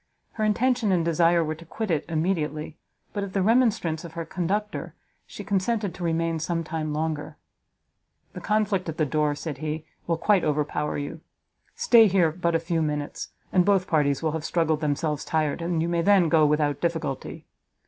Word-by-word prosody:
Her 220 - -3
intention 235 0 +2
and 175 -3 +2
desire 170 +1 +3
were 155 0 -2
to 160 +2 -12
quit 205 +4 -4
it 155 -3 0
immediately, 155 -2 -1 0.4
but 205 - -2
at 195 -1 -6
the 195 - +1
remonstrance 210 -8 +2
of 170 -2 -9
her 165 -1 -4
conductor, 190 +5 -3 0.3
she 205 - -8
consented 200 0 0
to 180 - -8
remain 165 -1 0
some 165 +1 -2
time 155 -1 -3
longer. 150 -1 -3 1.0
"The - - -7
conflict 205 -4 0
at 160 - -5
the 155 - +2
door," 150 +1 0
said 145 -2 -6
he, 155 0 -4 0.2
"will 165 -1 +1
quite 200 +1 +3
overpower 150 0 -1
you. 145 +3 -5 0.5
Stay 235 - +6
here 180 -4 +3
but 170 0 -1
a - - +3
few 165 0 -1
minutes, 150 -1 -3 0.3
and 185 - +5
both 195 -1 +3
parties 145 -3 +1
will 160 - +1
have 160 0 -4
struggled 160 -2 0
themselves 150 0 -1
tired, 155 0 -1
and 165 -1 0
you - - -1
may 170 0 +1
then 190 -2 +4
go 155 -2 +5
without 150 -1 +1
difficulty. 165 -6 -3
165 Hz, 185 wpm, -25 LUFS, 155-190 Hz, 1.0 s, Stay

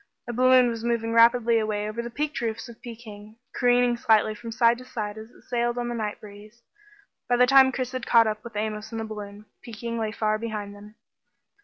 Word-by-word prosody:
A 240 - -4
balloon 255 +1 +5
was 230 -1 -4
moving 230 -1 -1
rapidly 230 0 +5
away 210 -1 -2
over 215 +2 -4
the 235 - -6
peaked 295 +5 -3
curved - - -6
roofs 225 +2 -5
of 235 -1 -14
Peking, 220 -3 -11 0.2
careening 245 -1 +3
slightly 220 -2 +3
from 230 +2 -9
side 230 +1 +3
to - - -10
side 210 -4 -5
as 220 +1 -10
it - - -21
sailed 240 0 -1
on 240 0 -2
the - - -3
night 215 -3 -4
breeze. 210 +3 -14 0.7
By 245 - +4
the 250 - +6
time 265 0 +6
Chris 255 -1 -3
had 255 -2 -5
caught 230 -1 +6
up 215 -1 -3
with 235 -2 -10
Amos 215 +1 -4
in 225 - -5
the 225 - -3
balloon, 210 -1 -8 0.2
Peking 235 0 -6
lay 220 -1 -2
far 215 0 -1
behind 210 -3 -5
them. 210 +1 -14
230 Hz, 220 wpm, -25 LUFS, 215-240 Hz, 0.7 s, the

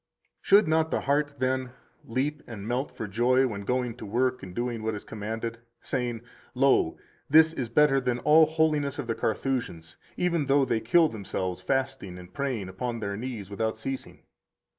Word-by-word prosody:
120 - - -18
Should 200 -1 +7
not 160 0 +2
the - - 0
heart, 145 +1 +1
then, 130 -1 -1 0.3
leap 140 +6 -2
and 105 -3 -7
melt 125 +4 -1
for 110 - -6
joy 125 +6 +3
when 105 -5 -3
going 125 +3 -1
to - - -9
work 125 +4 0
and 90 -1 -9
doing 120 -1 -2
what 110 0 -2
is 105 - -7
commanded, 115 +2 -5 0.2
saying: 120 -4 -2 0.3
Lo, 130 -10 +3 0.3
this 160 +2 +6
is 125 -7 -3
better 135 +2 +4
than 125 -1 0
all 155 +5 +6
holiness 155 -3 +1
of 145 - -3
the 115 - -1
Carthusians, 110 -10 -2 0.2
even 170 -5 +1
though 140 0 +4
they 115 -3 0
kill 155 +10 +4
themselves 95 -6 -4
fasting 135 -9 -2
and 90 0 -12
praying 130 -8 -2
upon 115 +5 -4
their 100 -2 -3
knees 110 -3 -6
without 110 +2 -1
ceasing? 135 +4 -6
125 Hz, 180 wpm, -27 LUFS, 110-140 Hz, 0.3 s, Should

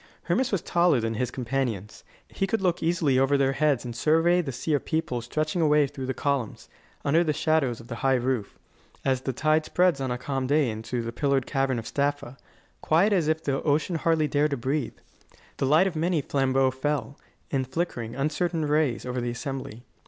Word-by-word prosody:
Hermas 260 - 0
was 195 -5 -1
taller 170 -6 +3
than 115 0 -2
his 120 +2 -1
companions; 120 -5 -3 0.2
he 195 - -2
could 225 - 0
look 180 -3 0
easily 160 -6 +2
over 135 +1 +3
their 135 -1 +2
heads 140 -3 +1
and 120 -1 -6
survey 165 +6 +3
the 145 -5 -4
sea 130 +5 -2
of 145 - +1
people 155 -7 -2
stretching 155 +7 -2
away 150 -2 +4
through 135 -1 -6
the 130 - -1
columns, 140 -6 -2 0.4
under 160 +4 +4
the 155 -3 0
shadows 150 -6 +1
of 115 - -12
the 115 - -6
high 135 +2 +2
roof, 125 -4 -2 0.5
as 130 -1 +1
the 130 - -2
tide 155 +4 +2
spreads 175 -4 +2
on 130 - -1
a 125 - -1
calm 135 0 -3
day 145 -3 +2
into 115 +2 -4
the 115 - -4
pillared 140 0 +1
cavern 135 -3 0
of 115 - -5
Staffa, 140 -2 -2 0.5
quiet 180 +7 +3
as 175 -6 +2
if 160 0 0
the 135 -1 -1
ocean 155 +3 +1
hardly 160 -1 +2
dared 150 +1 +1
to 140 - -2
breathe. 135 +1 -2 0.6
The 135 - 0
light 155 +6 +5
of 190 -3 -2
many 165 0 +1
flambeaux 135 -1 +2
fell, 140 +1 -3 0.3
in 135 -2 +1
flickering, 130 -5 -3
uncertain 155 +3 -1
rays, 150 -4 +1
over 125 0 -3
the 120 - -2
assembly. 125 -2 -6
140 Hz, 200 wpm, -26 LUFS, 130-155 Hz, 0.6 s, light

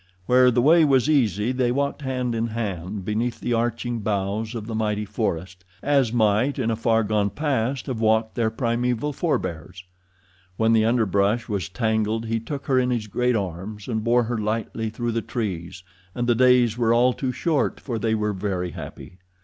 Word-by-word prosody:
Where 125 +2 +5
the 120 0 +2
way 165 +3 +6
was 135 -3 +3
easy 115 - +2
they 125 -2 +1
walked 140 +3 -1
hand 125 -3 -2
in 115 0 -1
hand 100 -4 -4
beneath 115 +3 -1
the 120 - -1
arching 120 +1 -1
boughs 105 +2 -2
of 110 -2 -5
the 115 - -6
mighty 105 -1 -1
forest, 95 -4 -3 0.2
as 135 -5 +2
might 110 +3 +2
in 115 -4 0
a - - 0
far 115 0 +2
gone 105 -1 +1
past 135 0 -1
have 130 -5 -4
walked 110 0 +2
their 115 -2 +1
primeval 120 +4 -1
forbears. 90 - -3 0.7
When 110 0 +3
the 110 -1 +4
underbrush 110 -1 +1
was 100 -2 -3
tangled 110 +1 0
he 115 0 -1
took 140 +5 -6
her 130 -2 +3
in 125 0 +1
his 120 -3 -1
great 125 +4 0
arms, 100 +1 -4
and 110 -3 -2
bore 120 +1 +3
her 115 0 -2
lightly 110 +1 -2
through 120 +2 -3
the 115 0 -1
trees, 95 -5 -4 0.3
and 120 - -1
the 120 - +3
days 125 -1 +4
were 115 -1 +3
all 125 +1 +4
too 130 0 -2
short, 155 +2 0
for 120 -4 -4
they 110 0 +1
were 105 -1 -1
very 95 -2 -3
happy. 90 +3 -10
115 Hz, 190 wpm, -24 LUFS, 105-125 Hz, 0.7 s, way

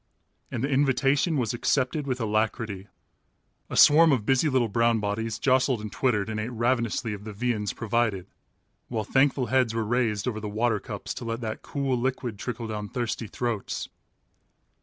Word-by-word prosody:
And 120 - -3
the - - +2
invitation 140 +3 +2
was 120 -4 0
accepted 135 +4 0
with 130 -1 -1
alacrity. 110 -2 -1 0.8
A - - -4
swarm 160 +2 +7
of 120 -7 +1
busy 135 +5 +3
little 130 -4 +2
brown 115 +2 +2
bodies 110 +2 -2
jostled 130 -2 +2
and 105 -1 -6
twittered 110 -6 +1
and 110 -1 -3
ate 110 +2 -3
ravenously 120 -1 0
of 100 0 -8
the 110 - -6
viands 105 -1 -1
provided, 110 -5 -1 0.6
while 110 -3 -2
thankful 135 +3 +2
heads 125 -4 +3
were 115 -1 0
raised 115 -2 0
over 110 -3 -2
the 105 -1 -5
water 110 +1 +1
cups - - -6
to - - -7
let 115 +1 -3
that 110 -2 -4
cool 140 -3 -1
liquid 125 -3 -2
trickle 120 -1 -4
down 105 -2 -5
thirsty 120 -2 -3
throats. 115 -2 -3
115 Hz, 170 wpm, -26 LUFS, 110-130 Hz, 0.8 s, swarm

